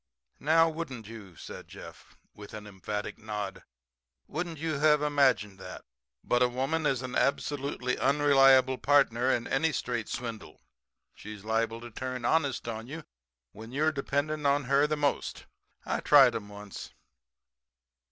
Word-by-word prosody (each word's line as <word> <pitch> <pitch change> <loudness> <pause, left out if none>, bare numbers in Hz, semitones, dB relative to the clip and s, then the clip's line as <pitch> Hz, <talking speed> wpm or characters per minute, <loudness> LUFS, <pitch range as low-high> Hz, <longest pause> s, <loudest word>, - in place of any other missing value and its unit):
"Now, 165 +2 +4
wouldn't 145 -9 -6
you," 105 -6 -11
said - - -10
Jeff, - - -13 0.2
with 105 +1 -11
an 105 -1 -8
emphatic 105 +1 -5
nod 105 -3 -5 0.6
"wouldn't 165 +1 -4
you 155 -1 -2
have 150 0 +4
imagined 130 -9 +2
that? 90 0 -9 0.4
But 120 - +1
a 125 - +5
woman 135 +6 -1
is 130 -2 0
an 130 -1 -5
absolutely 140 -2 -1
unreliable 135 -2 +5
partner 130 -3 +3
in 120 -3 +1
any 150 +5 +1
straight 120 -4 -3
swindle. 115 -4 -6 0.5
She's 105 -1 -10
liable 115 +1 -1
to 120 0 -9
turn 125 +1 -5
honest 140 -4 +1
on 115 0 -5
you 155 +4 -7 0.5
when 110 +3 -11
you 145 +4 0
are 155 - +3
depending 145 +1 -1
upon 140 0 +2
her 140 +3 +3
the 155 0 -1
most. 145 -1 -1 0.4
I - - -1
tried - - +6
'em 105 -2 -5
once. 105 -1 -10
130 Hz, 150 wpm, -29 LUFS, 110-145 Hz, 0.6 s, tried